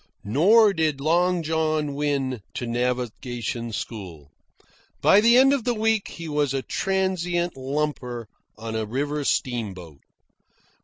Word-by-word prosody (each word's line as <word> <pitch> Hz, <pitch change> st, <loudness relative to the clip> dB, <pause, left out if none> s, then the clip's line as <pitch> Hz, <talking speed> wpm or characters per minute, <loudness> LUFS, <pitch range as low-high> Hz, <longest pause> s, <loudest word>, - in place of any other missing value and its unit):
Nor 200 Hz, -, +5 dB
did 155 Hz, -5 st, 0 dB
Long 175 Hz, +4 st, +2 dB
John 155 Hz, -2 st, 0 dB
win 140 Hz, -4 st, -1 dB
to 125 Hz, -, -3 dB
navigation 120 Hz, -1 st, -3 dB
school. 90 Hz, -, -7 dB, 0.7 s
By 200 Hz, -, +5 dB
the 235 Hz, +2 st, +6 dB
end 270 Hz, +2 st, +6 dB
of 275 Hz, -4 st, 0 dB
the 240 Hz, 0 st, 0 dB
week 220 Hz, -1 st, +1 dB
he 165 Hz, -1 st, -8 dB
was 145 Hz, -3 st, 0 dB
a 135 Hz, -, -2 dB
transient 180 Hz, -3 st, -1 dB
lumper 130 Hz, -3 st, -3 dB, 0.3 s
on 110 Hz, 0 st, -6 dB
a 110 Hz, -1 st, -2 dB
river 145 Hz, +5 st, -2 dB
steamboat. 95 Hz, -, -2 dB
145 Hz, 125 wpm, -24 LUFS, 120-175 Hz, 0.7 s, the